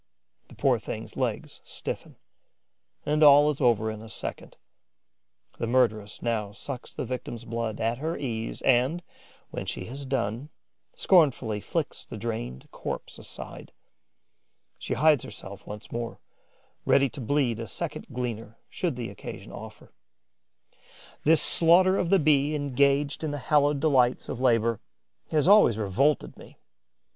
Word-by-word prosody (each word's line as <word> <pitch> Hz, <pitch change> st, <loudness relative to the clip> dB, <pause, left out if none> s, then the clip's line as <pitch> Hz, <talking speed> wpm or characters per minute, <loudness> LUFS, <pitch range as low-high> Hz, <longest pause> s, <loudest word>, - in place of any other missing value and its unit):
The -, -, -15 dB
poor -, -, +2 dB
thing's -, -, -7 dB
legs -, -, -3 dB
stiffen; -, -, -6 dB, 0.9 s
and 150 Hz, +1 st, +1 dB
all 145 Hz, 0 st, +8 dB
is 145 Hz, -, -7 dB
over 110 Hz, -3 st, +3 dB
in 110 Hz, 0 st, -8 dB
a 110 Hz, -, -11 dB
second. -, -, -5 dB, 1.0 s
The 115 Hz, -, -1 dB
murderess 110 Hz, -4 st, +1 dB
now 110 Hz, -4 st, -1 dB
sucks 125 Hz, +3 st, -7 dB
the -, -, -5 dB
victim's 120 Hz, -2 st, -5 dB
blood 115 Hz, -2 st, -3 dB
at 115 Hz, +2 st, -1 dB
her 160 Hz, +3 st, -2 dB
ease 115 Hz, -4 st, -4 dB
and, 135 Hz, +7 st, +2 dB, 0.5 s
when -, -, -5 dB
she -, -, -4 dB
has 135 Hz, +4 st, -7 dB
done, 125 Hz, +1 st, -2 dB, 0.5 s
scornfully 135 Hz, -, +3 dB
flings 160 Hz, +4 st, -3 dB
the -, -, -6 dB
drained 100 Hz, -, -5 dB
corpse -, -, -6 dB
aside. -, -, -9 dB, 1.1 s
She -, -, -3 dB
hides 150 Hz, -3 st, +4 dB
herself 100 Hz, 0 st, -9 dB
once 105 Hz, +1 st, -8 dB
more, 115 Hz, 0 st, -4 dB, 0.6 s
ready 140 Hz, 0 st, +4 dB
to 140 Hz, -, -8 dB
bleed 125 Hz, -2 st, +1 dB
a 115 Hz, -, -5 dB
second -, -, -5 dB
gleaner 115 Hz, -3 st, -5 dB
should 170 Hz, -7 st, -2 dB
the 120 Hz, -4 st, -5 dB
occasion 100 Hz, -, -9 dB
offer. -, -, -11 dB, 1.3 s
This 160 Hz, +1 st, +6 dB
slaughter 185 Hz, +3 st, +5 dB
of 170 Hz, -, 0 dB
the 195 Hz, -, +5 dB
Bee 150 Hz, -2 st, +3 dB
engaged 140 Hz, +1 st, +1 dB
in 155 Hz, -, -1 dB
the 145 Hz, -, -3 dB
hallowed 145 Hz, +1 st, +2 dB
delights 130 Hz, -5 st, +2 dB
of 125 Hz, -, -4 dB
labour 115 Hz, -3 st, +2 dB, 0.5 s
has 150 Hz, 0 st, +2 dB
always 200 Hz, -, +6 dB
revolted 110 Hz, +8 st, +1 dB
me. -, -, -14 dB
125 Hz, 140 wpm, -27 LUFS, 115-145 Hz, 1.3 s, all